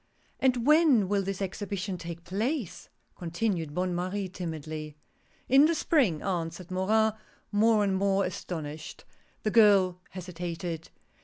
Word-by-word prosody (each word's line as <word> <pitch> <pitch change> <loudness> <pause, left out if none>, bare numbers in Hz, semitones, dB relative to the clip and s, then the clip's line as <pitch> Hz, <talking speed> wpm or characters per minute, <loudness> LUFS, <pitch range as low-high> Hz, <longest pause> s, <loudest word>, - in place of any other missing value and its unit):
" - - -37
And 250 -3 +2
when 300 - +5
will 200 +1 +1
this 195 0 -3
Exhibition 195 0 -4
take 170 -1 -7
place? 215 - -3
" - - -42
con 175 - -6
tinued 170 -5 -1
Bonne 180 0 0
Marie, 185 +2 -2
timidly. 155 -4 -6 0.5
"In 270 +3 +7
the 335 - +1
Spring," 255 - +2
answered 175 -1 -3
Morin, 215 +4 +2 0.4
more 215 0 +4
and 195 -1 +1
more 195 0 +2
astonished. 155 -4 -6 0.4
The 215 - 0
girl 200 -5 +5
hesitated. 175 -2 -5
190 Hz, 140 wpm, -28 LUFS, 170-215 Hz, 0.5 s, In